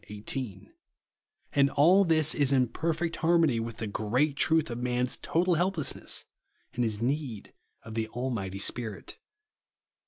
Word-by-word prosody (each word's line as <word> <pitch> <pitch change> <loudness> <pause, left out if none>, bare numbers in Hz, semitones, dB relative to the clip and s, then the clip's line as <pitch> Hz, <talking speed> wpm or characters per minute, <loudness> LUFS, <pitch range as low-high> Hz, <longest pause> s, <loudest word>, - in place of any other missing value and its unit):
18); 110 - -5 0.8
and 140 -1 +4
all 175 +8 +5
this 160 -3 +3
is 140 -2 +2
in 130 -2 +3
per 160 +8 -1
fect 165 +1 -2
harmony 165 -7 +3
with 115 0 -5
the 110 - -4
great 120 +8 0
truth 155 -1 +2
of 120 - -4
man's 125 0 0
total 175 +2 +1
helplessness 175 -2 -1 0.5
and 120 - 0
his 110 -3 -1
need 130 -5 -3 0.3
of 115 - -9
the 110 0 -2
Al 130 +2 -2
mighty 95 -5 -4
Spirit. 110 +1 -4
130 Hz, 150 wpm, -29 LUFS, 115-160 Hz, 0.8 s, all